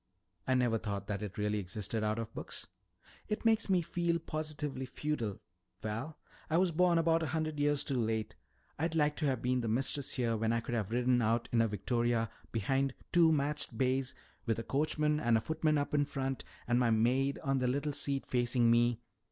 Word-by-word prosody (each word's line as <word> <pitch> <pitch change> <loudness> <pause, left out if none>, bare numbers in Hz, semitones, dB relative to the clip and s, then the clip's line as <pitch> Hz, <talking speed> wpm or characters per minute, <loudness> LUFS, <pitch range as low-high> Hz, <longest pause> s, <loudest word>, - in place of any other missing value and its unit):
"I 130 - +3
never 120 -3 +2
thought 100 -3 -4
that 100 -1 -3
it 105 0 -6
really 105 0 0
existed 105 +3 -3
out 105 +1 0
of 115 -1 -5
books." - - -7 0.6
"It 210 - -3
makes 225 -2 +3
me 180 -2 +3
feel 170 0 0
positively 155 -4 -4
feudal. 125 -8 -3 0.4
Val, 115 +9 -4 0.3
I 160 - +2
was 180 0 +3
born 175 +1 +3
about 165 0 +3
a 160 - -1
hundred 155 +1 -2
years 145 0 +2
too 135 -4 0
late. 110 -1 -2 0.4
I'd 165 +1 -1
like 150 -1 +2
to 150 - 0
have 130 -3 -1
been 125 0 +1
the 115 - -2
mistress 135 +4 0
here 120 -3 +1
when 110 +1 +1
I 115 - +2
could 120 - -5
have 110 -4 -1
ridden 125 +1 +2
out 115 +1 +1
in 115 - +4
a 115 - +3
victoria 115 +2 0 0.2
behind 135 +5 0 0.2
two 170 -2 +6
matched 150 0 -1
bays, 130 0 +1 0.3
with 115 - +1
a 115 - -3
coachman 150 +3 +1
and 120 -4 +3
a - - +2
footman 155 +4 0
up 145 0 -2
in 145 -1 +3
front 135 -1 -3 0.2
and 120 0 +3
my 120 -2 +3
maid 125 +5 +2
on 135 -1 +1
the 125 - +1
little 145 +3 -1
seat 140 -1 -1
facing 120 -1 +2
me." 120 0 +3
130 Hz, 200 wpm, -33 LUFS, 115-150 Hz, 0.6 s, two